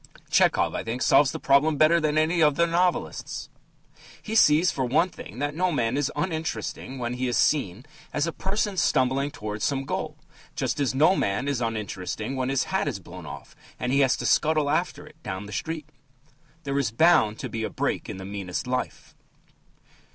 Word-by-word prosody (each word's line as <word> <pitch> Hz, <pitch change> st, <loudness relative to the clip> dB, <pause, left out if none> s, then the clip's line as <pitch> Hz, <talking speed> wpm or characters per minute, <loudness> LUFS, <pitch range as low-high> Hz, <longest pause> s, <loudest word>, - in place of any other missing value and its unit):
Tchehov, -, -, +3 dB
I -, -, -3 dB
think, 120 Hz, +3 st, -3 dB
solves 140 Hz, -3 st, +5 dB
the -, -, -4 dB
problem 145 Hz, +2 st, +3 dB
better 155 Hz, +3 st, +5 dB
than 155 Hz, -1 st, 0 dB
any 165 Hz, +2 st, +2 dB
of 150 Hz, -2 st, +4 dB
the 170 Hz, -, +3 dB
other 170 Hz, -, 0 dB
novelists. 175 Hz, +1 st, -1 dB, 0.7 s
He 220 Hz, -, -7 dB
sees, 170 Hz, -4 st, +5 dB
for 135 Hz, -, -2 dB
one 145 Hz, +9 st, +2 dB
thing, 105 Hz, -, -11 dB
that 145 Hz, +2 st, -2 dB
no 180 Hz, +3 st, +1 dB
man 120 Hz, -5 st, 0 dB
is 145 Hz, -1 st, 0 dB
uninteresting 155 Hz, -4 st, -3 dB
when 120 Hz, -1 st, -3 dB
he 125 Hz, +1 st, -2 dB
is 120 Hz, -3 st, 0 dB
seen 120 Hz, -5 st, +1 dB, 0.3 s
as 150 Hz, -, 0 dB
a 165 Hz, -, -2 dB
person 195 Hz, +2 st, -2 dB
stumbling 135 Hz, -2 st, +2 dB
towards 105 Hz, -5 st, -6 dB
some 135 Hz, -1 st, 0 dB
goal, -, -, -4 dB, 0.4 s
just -, -, -2 dB
as 135 Hz, -2 st, 0 dB
no 160 Hz, +7 st, +5 dB
man 100 Hz, -, -1 dB
is 140 Hz, -3 st, -1 dB
uninteresting 110 Hz, +1 st, -3 dB
when 130 Hz, 0 st, -1 dB
his 135 Hz, -1 st, +1 dB
hat -, -, -1 dB
is -, -, -2 dB
blown -, -, -11 dB
off -, -, -10 dB, 0.2 s
and 125 Hz, -, -1 dB
he 140 Hz, -, +3 dB
has 135 Hz, -2 st, +3 dB
to -, -, -5 dB
scuttle 155 Hz, -2 st, +2 dB
after 155 Hz, -1 st, -1 dB
it 155 Hz, +1 st, -18 dB
down 95 Hz, -4 st, -5 dB
the 105 Hz, -, -9 dB
street. 160 Hz, +4 st, -4 dB, 0.8 s
There 140 Hz, 0 st, -1 dB
is 135 Hz, -, 0 dB
bound 115 Hz, -4 st, +4 dB
to -, -, -5 dB
be 110 Hz, -, -4 dB
a -, -, -2 dB
break -, -, -2 dB
in -, -, -5 dB
the 95 Hz, -, -8 dB
meanest 100 Hz, +1 st, -4 dB
life. 125 Hz, 0 st, -4 dB
140 Hz, 200 wpm, -25 LUFS, 120-155 Hz, 0.8 s, solves